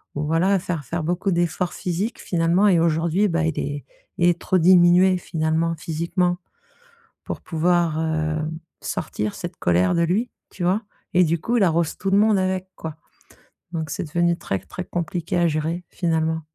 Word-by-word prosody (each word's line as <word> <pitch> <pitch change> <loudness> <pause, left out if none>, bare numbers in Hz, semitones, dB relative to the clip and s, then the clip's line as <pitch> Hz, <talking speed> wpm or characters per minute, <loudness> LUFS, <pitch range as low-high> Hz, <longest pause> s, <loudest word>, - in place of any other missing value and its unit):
ou 145 - -2
voilà 180 +5 +2
faire 170 -6 -4
faire 165 +5 -3
beaucoup 180 +4 0
d'efforts 175 +1 0
physiques 185 +6 -3
finalement 175 +3 +2
et 175 -4 +5
aujourd'hui 170 +5 +2
bah 170 -1 +1
il 160 - -1
est 145 0 -4 0.3
il 175 -1 +3
est 175 - 0
trop 185 - +1
diminué 180 +1 +6
finalement 165 0 -1
physiquement 170 +3 -1 0.9
pour - - -5
pouvoir, 170 -1 +1
heu, 155 -1 0 0.5
sortir 105 0 -3
cette 175 -1 -6
colère 90 - +2
de 170 - +2
lui, 210 +8 0 0.2
tu 180 - -6
vois? 185 +5 +2 0.3
Et 180 - +6
du 165 0 0
coup 240 +6 0
il 215 - +4
arrose 170 -2 +1
tout 195 0 -2
le 200 - +5
monde 215 -1 +4
avec 185 0 -1
quoi, 160 -2 -6 0.8
donc 160 -3 -3
c'est - - -3
devenu 170 +2 +1
très, 95 - -2
très 180 - -7
compliqué 175 0 -3
à 175 - +3
gérer 160 +3 -2
finalement. 160 -2 0
170 Hz, 175 wpm, -23 LUFS, 160-180 Hz, 0.9 s, diminué